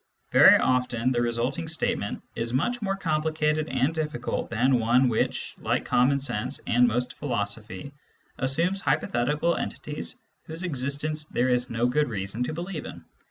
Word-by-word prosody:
Very -, -, +8 dB
often 125 Hz, -1 st, +1 dB
the 120 Hz, -2 st, +1 dB
resulting 120 Hz, +6 st, -1 dB
statement 160 Hz, -9 st, -2 dB
is 115 Hz, +1 st, -2 dB
more 210 Hz, -, 0 dB
complicated 155 Hz, -2 st, 0 dB
and 130 Hz, +4 st, +1 dB
difficult 150 Hz, -7 st, -3 dB
than 125 Hz, +2 st, +3 dB
one 125 Hz, +3 st, +4 dB
which, 110 Hz, -, -1 dB
like -, -, -1 dB
common 135 Hz, +3 st, +3 dB
sense 125 Hz, 0 st, -3 dB
and 120 Hz, +1 st, +4 dB
most 125 Hz, +2 st, -1 dB
philosophy, 110 Hz, -3 st, -4 dB, 0.5 s
assumes 170 Hz, +9 st, +1 dB
hypothetical 150 Hz, +7 st, +1 dB
entities -, -, -5 dB, 0.3 s
whose 160 Hz, +3 st, -6 dB
existence 150 Hz, 0 st, -2 dB
there 130 Hz, -3 st, 0 dB
is 125 Hz, 0 st, +1 dB
no 115 Hz, +1 st, 0 dB
good 135 Hz, +3 st, +2 dB
reason 100 Hz, +1 st, -4 dB
to -, -, -3 dB
believe 170 Hz, -2 st, -5 dB
in. -, -, -9 dB
130 Hz, 145 wpm, -26 LUFS, 120-155 Hz, 0.5 s, Very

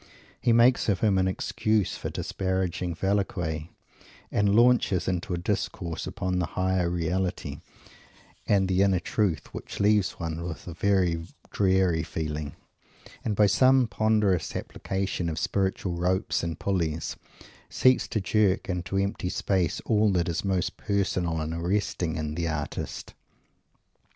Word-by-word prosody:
He 120 Hz, -, +3 dB
makes 120 Hz, +1 st, +4 dB
of 95 Hz, -3 st, +1 dB
him 100 Hz, -4 st, +3 dB
an 95 Hz, -, +2 dB
excuse 105 Hz, +2 st, 0 dB
for -, -, -5 dB
disparaging 95 Hz, -2 st, -2 dB
Velasquez, 90 Hz, -5 st, -1 dB, 0.7 s
and 100 Hz, 0 st, +2 dB
launches 120 Hz, -5 st, +4 dB
into 90 Hz, -1 st, -1 dB
a -, -, -4 dB
discourse 85 Hz, -2 st, -3 dB
upon 95 Hz, -2 st, -2 dB
the 90 Hz, -, 0 dB
Higher 95 Hz, -1 st, +1 dB
Reality 90 Hz, +2 st, -2 dB, 0.9 s
and 100 Hz, -2 st, +3 dB
the 95 Hz, 0 st, +2 dB
Inner 95 Hz, -2 st, +3 dB
Truth 90 Hz, -6 st, -1 dB
which -, -, -7 dB
leaves 105 Hz, -2 st, +3 dB
one 85 Hz, -1 st, -4 dB
with 85 Hz, -2 st, -6 dB
a 90 Hz, -, -6 dB
very 90 Hz, -2 st, +1 dB, 0.2 s
dreary 95 Hz, -4 st, +2 dB
feeling, 75 Hz, -2 st, -4 dB, 0.7 s
and, 105 Hz, -, -1 dB
by 105 Hz, -, +5 dB
some 130 Hz, +5 st, +5 dB
ponderous 105 Hz, -4 st, +1 dB
application 95 Hz, -3 st, -3 dB
of 80 Hz, -, -4 dB
spiritual 95 Hz, 0 st, -1 dB
ropes 90 Hz, +4 st, 0 dB
and 85 Hz, -1 st, -3 dB
pulleys, 85 Hz, -5 st, -1 dB, 0.5 s
seems 130 Hz, 0 st, +3 dB
to 110 Hz, -, -1 dB
jerk 100 Hz, -1 st, +1 dB
into 90 Hz, +1 st, -2 dB
empty 100 Hz, -2 st, -1 dB
space 90 Hz, -3 st, 0 dB
all 105 Hz, -2 st, +3 dB
that 85 Hz, -2 st, +1 dB
is 85 Hz, -1 st, -2 dB
most 95 Hz, -3 st, -1 dB
personal 90 Hz, -5 st, 0 dB
and 80 Hz, +1 st, -3 dB
arresting 85 Hz, -1 st, -1 dB
in 75 Hz, -2 st, -3 dB
the 85 Hz, +1 st, -2 dB
artist. 75 Hz, -2 st, -4 dB
95 Hz, 140 wpm, -27 LUFS, 85-100 Hz, 0.9 s, by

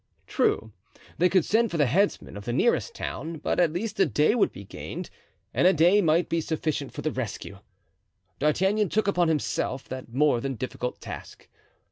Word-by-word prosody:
True, 110 Hz, -, 0 dB, 0.5 s
they 180 Hz, +2 st, +4 dB
could 185 Hz, -3 st, +3 dB
send 230 Hz, +2 st, +2 dB
for 170 Hz, -, -3 dB
the 145 Hz, -, +4 dB
headsman 190 Hz, -, 0 dB
of 105 Hz, -, -8 dB
the 120 Hz, -, -2 dB
nearest 240 Hz, -, +1 dB
town, 165 Hz, 0 st, -5 dB
but -, -, -1 dB
at 170 Hz, -3 st, +4 dB
least 200 Hz, +7 st, -4 dB
a 195 Hz, -, +6 dB
day 150 Hz, -, +3 dB
would 235 Hz, -, +2 dB
be 100 Hz, -, -10 dB
gained, 100 Hz, -, -7 dB, 0.4 s
and 180 Hz, -, +4 dB
a 190 Hz, -, +6 dB
day 175 Hz, +6 st, +5 dB
might 165 Hz, 0 st, +2 dB
be 165 Hz, 0 st, 0 dB
sufficient 155 Hz, -3 st, -2 dB
for -, -, -7 dB
the 155 Hz, -, 0 dB
rescue. 110 Hz, -6 st, -5 dB, 0.8 s
D'Artagnan 190 Hz, +7 st, +2 dB
took 215 Hz, +3 st, 0 dB
upon 180 Hz, -3 st, +2 dB
himself 145 Hz, -4 st, -1 dB
that 130 Hz, -3 st, -7 dB
more 135 Hz, -1 st, +2 dB
than 135 Hz, 0 st, -3 dB
difficult 125 Hz, +1 st, -4 dB
task. -, -, -9 dB
160 Hz, 185 wpm, -26 LUFS, 130-190 Hz, 0.8 s, a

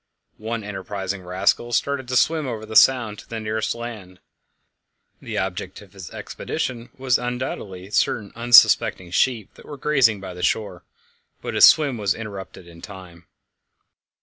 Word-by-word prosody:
One 110 Hz, +1 st, -4 dB
enterprising 95 Hz, -1 st, -5 dB
rascal 95 Hz, +6 st, 0 dB
started 140 Hz, +1 st, -1 dB
to 125 Hz, -, -3 dB
swim 155 Hz, +2 st, +2 dB
over 110 Hz, -3 st, -5 dB
the 110 Hz, 0 st, -9 dB
sound 115 Hz, -6 st, +4 dB
to -, -, -15 dB
the 115 Hz, -, -4 dB
nearest 110 Hz, +1 st, -2 dB
land 110 Hz, -6 st, -8 dB, 1.0 s
the -, -, -6 dB
object 95 Hz, 0 st, -4 dB
of 95 Hz, -1 st, -20 dB
his 95 Hz, -4 st, -10 dB
expedition 120 Hz, -2 st, -5 dB
was 130 Hz, -2 st, +1 dB
undoubtedly 120 Hz, -6 st, -5 dB
certain 100 Hz, +2 st, 0 dB
unsuspecting 115 Hz, -6 st, +5 dB
sheep 115 Hz, +1 st, 0 dB
that -, -, -17 dB
were 145 Hz, -, -8 dB
grazing 130 Hz, -7 st, +2 dB
by 95 Hz, -1 st, -8 dB
the 90 Hz, -, -9 dB
shore 95 Hz, -3 st, -1 dB, 0.6 s
but -, -, -4 dB
his -, -, +8 dB
swim 145 Hz, -7 st, +4 dB
was 100 Hz, -2 st, 0 dB
interrupted 100 Hz, -4 st, -8 dB
in 85 Hz, 0 st, -14 dB
time. 90 Hz, -4 st, -12 dB
105 Hz, 150 wpm, -22 LUFS, 95-120 Hz, 1.0 s, his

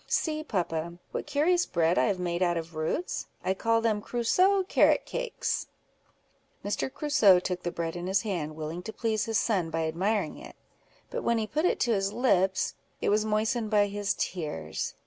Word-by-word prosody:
See, 310 Hz, -1 st, 0 dB
papa, 170 Hz, -, -2 dB
what -, -, -4 dB
curious 325 Hz, +5 st, +2 dB
bread 170 Hz, +1 st, +2 dB
I -, -, +4 dB
have 200 Hz, -3 st, +1 dB
made 175 Hz, -1 st, -2 dB
out 175 Hz, -1 st, +2 dB
of 165 Hz, 0 st, -5 dB
roots: 160 Hz, -, -2 dB, 0.2 s
I 190 Hz, -, +1 dB
call 230 Hz, +3 st, +1 dB
them 220 Hz, -2 st, +1 dB
Crusoe 365 Hz, -, +2 dB
carrot 445 Hz, +6 st, +3 dB
cakes." -, -, -2 dB, 1.0 s
Mr. 205 Hz, +5 st, -1 dB
Crusoe 285 Hz, -12 st, +5 dB
took 180 Hz, 0 st, -3 dB
the 175 Hz, -, -2 dB
bread 165 Hz, -1 st, -3 dB
in 175 Hz, +1 st, -4 dB
his 190 Hz, 0 st, +2 dB
hand, 165 Hz, -8 st, -3 dB
willing 160 Hz, +2 st, -5 dB
to 220 Hz, +4 st, -7 dB
please 220 Hz, -2 st, -1 dB
his 225 Hz, -2 st, 0 dB
son 195 Hz, -6 st, 0 dB
by 165 Hz, 0 st, -1 dB
admiring 190 Hz, +2 st, -1 dB
it; -, -, -11 dB, 0.6 s
but -, -, -2 dB
when 235 Hz, -, +1 dB
he 220 Hz, -, 0 dB
put 305 Hz, +9 st, -1 dB
it -, -, +2 dB
to 235 Hz, -, +3 dB
his 195 Hz, -1 st, 0 dB
lips, 190 Hz, -7 st, +2 dB, 0.3 s
it -, -, 0 dB
was 210 Hz, +1 st, +2 dB
moistened 220 Hz, +2 st, 0 dB
by 210 Hz, -1 st, +4 dB
his 205 Hz, 0 st, -2 dB
tears. 80 Hz, -, -3 dB
205 Hz, 185 wpm, -28 LUFS, 175-235 Hz, 1.0 s, Crusoe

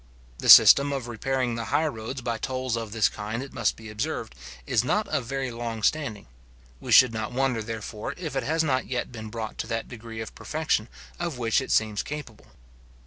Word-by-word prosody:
The -, -, -2 dB
system 140 Hz, +1 st, +9 dB
of 135 Hz, -4 st, -3 dB
repairing 125 Hz, +2 st, -1 dB
the 115 Hz, 0 st, -4 dB
high 155 Hz, -, +1 dB
roads 125 Hz, -2 st, -4 dB
by 115 Hz, -2 st, -3 dB
tolls 130 Hz, 0 st, -2 dB
of 115 Hz, -2 st, -5 dB
this 110 Hz, -2 st, +3 dB
kind, 110 Hz, +4 st, -5 dB
it 140 Hz, -, -11 dB
must 115 Hz, -5 st, 0 dB
be 110 Hz, -, -11 dB
observed, 115 Hz, +2 st, -4 dB, 0.3 s
is 110 Hz, -, +2 dB
not 210 Hz, +11 st, 0 dB
of 140 Hz, -5 st, -1 dB
very 135 Hz, +1 st, -3 dB
long 115 Hz, -2 st, -5 dB
standing. 130 Hz, -9 st, 0 dB, 0.5 s
We -, -, -6 dB
should 130 Hz, -3 st, +7 dB
not 110 Hz, 0 st, -3 dB
wonder, 130 Hz, -3 st, 0 dB
therefore, 110 Hz, -1 st, -5 dB
if 160 Hz, -6 st, -5 dB
it 135 Hz, -, +1 dB
has 160 Hz, +2 st, 0 dB
not 130 Hz, -5 st, 0 dB
yet 125 Hz, -1 st, -3 dB
been 110 Hz, -2 st, -7 dB
brought 110 Hz, 0 st, -6 dB
to -, -, -3 dB
that 115 Hz, 0 st, -3 dB
degree 115 Hz, -1 st, -8 dB
of 110 Hz, -, -6 dB
perfection 155 Hz, -8 st, -1 dB, 0.3 s
of 170 Hz, -6 st, -3 dB
which 115 Hz, +2 st, +1 dB
it 130 Hz, -, -7 dB
seems 110 Hz, -2 st, +2 dB
capable. 145 Hz, -7 st, -8 dB
120 Hz, 200 wpm, -26 LUFS, 110-135 Hz, 0.5 s, system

